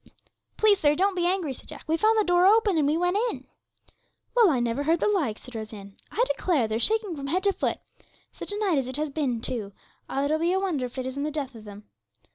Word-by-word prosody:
'Please, 420 -2 +4
sir, 295 -3 +3
don't 390 +4 +2
be 350 -1 +1
angry,' 360 -6 0
said - - -14
Jack; - - -10
'we 320 - +2
found 435 +6 +3
the 430 - +4
door 355 0 +4
open, 425 -2 +4
and 300 -3 +2
we 305 +2 +2
went 355 +2 +1
in.' - - -6 0.9
'Well, 465 -5 +6
I 270 -6 +1
never 240 +3 -1
heard 325 +3 +2
the - - +1
like,' 315 - 0
said 250 - -13
Rose 220 -1 -6
Ann. 200 -1 -11
'I 470 - +1
declare 300 -11 +1
they're 220 +1 -2
shaking 430 - +1
from 275 -2 -6
head 365 +6 0
to 400 -1 +3
foot. - - -1 0.5
Such - - -5
a 410 - -3
night 385 -8 +1
as 260 - -3
it 260 +1 0
has 300 -1 -2
been, 270 -6 -1
too; 220 -5 -3 0.4
it'll 285 +3 0
be 340 +2 +1
a 380 - +2
wonder 325 -10 -1
if 245 - -15
it 260 - -3
isn't 260 +2 -4
the 300 - -1
death 285 -3 -4
of 220 -2 -12
them.' 205 0 -10
310 Hz, 255 wpm, -26 LUFS, 255-380 Hz, 0.9 s, Well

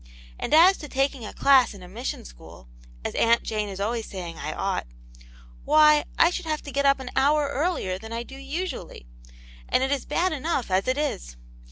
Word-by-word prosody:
And - - -4
as 350 +5 +7
to 295 - -9
taking 270 -4 -1
a - - -7
class 265 -6 +4
in 190 - -12
a - - -10
mission 225 - -5
school, - - -14 0.4
as - - -2
Aunt 230 0 +3
Jane 215 -1 -2
is 195 -1 -7
always 225 +2 -2
saying 175 -4 -7
I - - -4
ought, - - -2 0.8
why, 305 -1 +5
I 335 - +5
should 360 -1 -5
have 310 -1 -2
to 285 - -8
get 280 0 +1
up 275 0 +4
an 255 -1 -7
hour 290 +2 +3
earlier 280 - -1
than 220 +2 -10
I 230 +1 -3
do 265 - -12
usually, 285 - -6 0.6
and 255 - +2
it 270 - 0
is 280 -2 -1
bad 350 +5 +1
enough 290 - -2
as 190 +4 +1
it 255 +2 +1
is. - - -3
270 Hz, 205 wpm, -25 LUFS, 215-300 Hz, 0.8 s, as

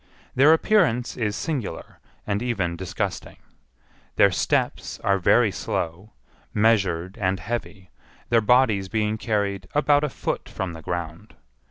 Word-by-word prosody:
Their 140 +4 +6
appearance 160 - +2
is 105 -4 -2
singular, 130 - -5 0.3
and 100 0 -1
even 100 -9 -1
disgusting. 90 -2 -4 0.8
Their - - +5
steps - - -1
are 100 -1 +2
very 110 +4 +4
slow, 95 +4 -4 0.4
measured, 95 -4 +1
and 95 -1 0
heavy, 100 -2 -6 0.4
their 115 -1 +4
bodies 110 -4 +3
being 110 0 -1
carried 100 -4 -1
about 145 0 +3
a 150 - 0
foot - - -4
from 95 -2 -4
the 80 - -9
ground. 85 +4 -6
105 Hz, 130 wpm, -24 LUFS, 95-120 Hz, 0.8 s, Their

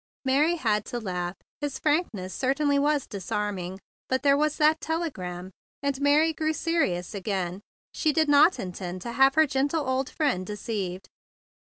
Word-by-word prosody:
Mary 290 +6 +3
had 215 - +1
to 240 - -5
laugh. 180 -4 -3 0.2
His 290 -2 -3
frankness 290 - -1
certainly 280 +2 +1
was 290 -1 +1
disarming. 195 -1 -4 0.3
But 260 +1 0
there 280 -1 +5
was 300 +1 +1
that 310 +1 +3
telegram! 190 - -4 0.3
And 280 -1 -1
Mary 300 +3 +4
grew 315 0 -1
serious 295 - -1
again. 190 -2 -3 0.3
She 310 - +1
did 315 +1 +2
not 290 +5 +6
intend 180 -1 -6
to 235 - -4
have 270 +3 +4
her 315 0 +6
gentle 285 +2 0
old 260 0 0
friend 275 - 0
deceived. 195 -2 -4
265 Hz, 155 wpm, -26 LUFS, 190-300 Hz, 0.3 s, not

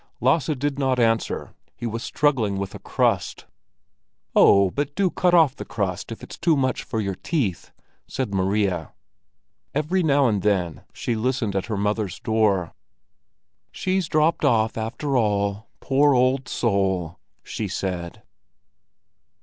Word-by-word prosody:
Lasse 130 +5 +2
did 140 +1 -2
not 130 -2 +1
answer; 115 -1 0 0.2
he - - -7
was 115 0 -3
struggling 125 -9 +1
with 95 0 -4
a - - -8
crust. - - -1 0.9
"Oh, 100 -2 +6
but 145 0 -3
do 195 -3 +1
cut 180 -1 +2
off 155 -6 +5
the - - -7
crust 95 -1 -3
if 115 - -8
it's - - -10
too 165 -4 +3
much 130 -1 0
for 115 -4 -4
your 100 -2 -1
teeth!" 110 - -2 0.4
said 130 -6 -3
Maria. 95 -3 0 0.8
Every 155 +6 +1
now 140 -4 +3
and 105 -4 0
then 90 -6 0
she 120 - -3
listened 115 -2 -1
at 95 - -1
her 110 -4 -2
mother's 105 -1 -1
door. 105 -6 +1 1.0
"She's 185 -2 -1
dropped 155 +2 +2
off, 110 -2 +2
after 125 +6 -3
all, 100 -1 0
poor 140 +1 +3
old 130 +1 +2
soul!" 95 -6 0 0.2
she 110 - -4
said. 90 -2 -4
115 Hz, 140 wpm, -23 LUFS, 100-140 Hz, 1.0 s, Oh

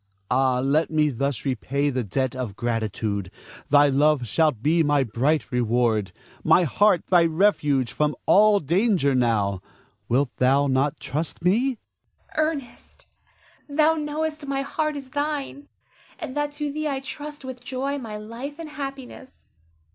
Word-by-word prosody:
Ah, 130 0 +3
let 145 +5 +1
me 155 -1 +2
thus 140 +1 -2
repay 140 +2 -1
the 130 -1 -1
debt 130 +6 -2
of 125 -6 -4
gratitude. 110 -4 -2 0.4
Thy 145 0 +6
love 145 -1 +2
shalt 140 -1 +1
be 165 +3 +3
my 145 -2 +3
bright 135 +7 0
reward; 115 -4 +1 0.3
my 180 - +5
heart 190 +5 +2
thy 175 -2 +4
refuge 155 - +2
from 150 0 0
all 210 0 +5
danger 170 - +2
now. 105 -6 +1 0.5
Wilt 125 +1 +1
thou 135 +3 +3
not 135 +1 0
trust 145 +4 -4
me? 235 +8 +2 0.6
Zara. 310 +1 +2
Ernest, 275 -5 -11 0.6
thou 305 +2 +3
knowest 305 -1 -3
my 275 0 -1
heart 305 +2 -2
is 270 -2 -8
thine, 290 -1 -3 0.5
and 260 - -7
that 295 0 -1
to 295 0 -3
thee 305 +1 -3
I 275 -2 -1
trust 290 +1 -8
with 255 -1 -8
joy 270 +3 -3
my 220 -4 -6
life 235 +7 -7
and 330 -2 -7
happiness. 275 -3 -9
160 Hz, 145 wpm, -24 LUFS, -, 0.6 s, Thy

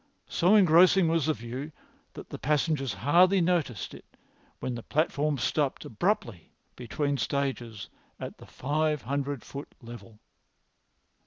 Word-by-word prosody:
So 180 +5 +3
engrossing 185 -1 +6
was 165 -3 +1
the 155 - +2
view 130 +6 -6 0.4
that - - -11
the - - -6
passengers 150 -2 0
hardly 180 +6 +4
noticed 165 - 0
it - - -15 0.4
when 130 - -3
the 120 - -5
platform 150 +1 0
stopped 140 +1 -1
abruptly 115 - -2 0.2
between 140 +4 -2
stages 120 -8 -2 0.3
at - - -7
the - - -13
five 150 +1 -1
hundred 140 -1 -3
foot 140 +1 -9
level. 115 -2 -11
145 Hz, 130 wpm, -28 LUFS, 125-160 Hz, 0.4 s, engrossing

